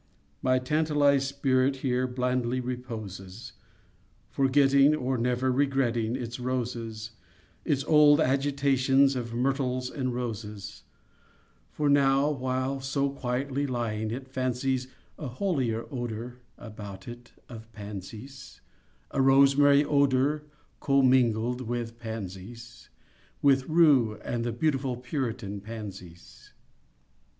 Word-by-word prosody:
My 130 0 +3
tantalized 145 0 +2
spirit 135 -1 +1
Here 130 0 +1
blandly 125 0 -1
reposes, 115 -5 -7 0.8
Forgetting, 140 +1 +4
or 130 -2 -1
never 125 +2 0
Regretting 125 -4 +1
its 120 -1 -5
roses— 115 -3 -4 0.5
Its 140 -3 0
old 150 -1 +6
agitations 135 0 +2
Of 120 -2 -4
myrtles 130 0 -1
and 130 -3 -2
roses: 110 -5 -6 0.8
For 150 - -2
now, 140 0 +4
while 130 0 -2
so 140 +1 -1
quietly 135 +2 -2
Lying, 110 -4 -2
it 130 +4 -5
fancies 130 0 -1 0.3
A 150 - -4
holier 125 - -1
odor 120 -1 -5 0.2
About 105 -3 -10
it, 120 0 -10
of 115 -2 -11
pansies— 105 +6 -9 0.5
A 135 - +1
rosemary 140 +2 +5
odor, 140 +1 +2 0.3
Commingled 125 -3 +2
with 120 -1 -4
pansies— 115 +2 -8 0.5
With 135 -1 +3
rue 145 -9 +4
and 120 -1 -2
the 120 - -1
beautiful 135 -3 -1
Puritan 120 -6 -4
pansies. 100 -6 -10
130 Hz, 105 wpm, -27 LUFS, 115-135 Hz, 0.8 s, old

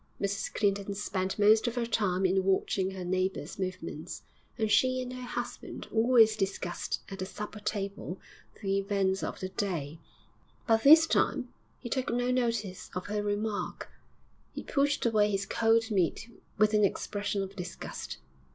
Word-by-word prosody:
Mrs 200 +1 -2
Clinton 200 -1 0
spent 190 -2 -2
most 215 +3 +5
of 235 - -2
her 240 -1 0
time 195 -5 +1
in 190 +1 +3
watching 190 0 +1
her 190 -2 -6
neighbours' 185 -3 -2
movements, 185 -3 -5 0.3
and 220 -2 0
she 255 +2 +4
and 255 0 -4
her 255 - -7
husband 245 -1 -5
always 225 -1 +5
discussed 195 -3 -2
at 195 -1 -7
the 185 - -2
supper 210 +2 -7
table 200 -3 -4 0.4
the 195 0 +1
events 195 -1 0
of - - -4
the 185 - -3
day, 165 -6 -3 0.7
but 225 -1 +3
this 315 +5 +9
time 250 -5 +1 0.3
he 245 - -8
took 255 +2 -1
no 245 +1 +1
notice 230 -7 -1
of 180 - -3
her 210 0 -2
remark. 205 +1 -3 0.6
He - - -5
pushed 285 -1 +1
away 215 -3 +3
his 195 -1 -1
cold 225 +1 +2
meat 205 +4 0 0.3
with 215 0 +4
an 210 0 +4
expression 200 0 -1
of 195 +1 -8
disgust. 180 - -6
205 Hz, 160 wpm, -30 LUFS, 190-225 Hz, 0.7 s, this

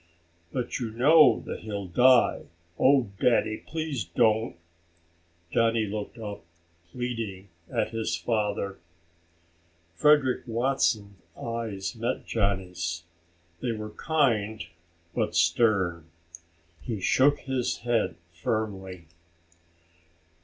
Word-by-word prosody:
"But 125 0 -3
you 120 -3 -3
know 130 +2 +5
that - - -5
he'll 100 -2 -5
die. 125 +7 +4 0.3
Oh, 130 -5 +4
Daddy, 115 -3 +2
please 155 -7 -4
don't!" 110 +3 +1 1.0
Johnny 115 -1 +2
looked 105 +2 -5
up, 105 -2 -7 0.5
pleading, 115 -6 -4 0.2
at - - 0
his 115 -1 -1
father. 105 -4 -1 1.1
Frederick 140 - +4
Watson's 115 -5 0 0.2
eyes 115 -3 -4
met 115 +3 -2
Johnny's. 90 -5 -1 0.6
They 120 -2 -1
were 110 -1 -6
kind 110 - 0 0.5
but - - -1
stern. 85 -1 +2 0.7
He 110 -4 -4
shook 140 +9 +3
his 130 -2 -1
head 120 -2 0 0.2
firmly. 95 -1 -3
110 Hz, 95 wpm, -27 LUFS, 100-125 Hz, 1.1 s, know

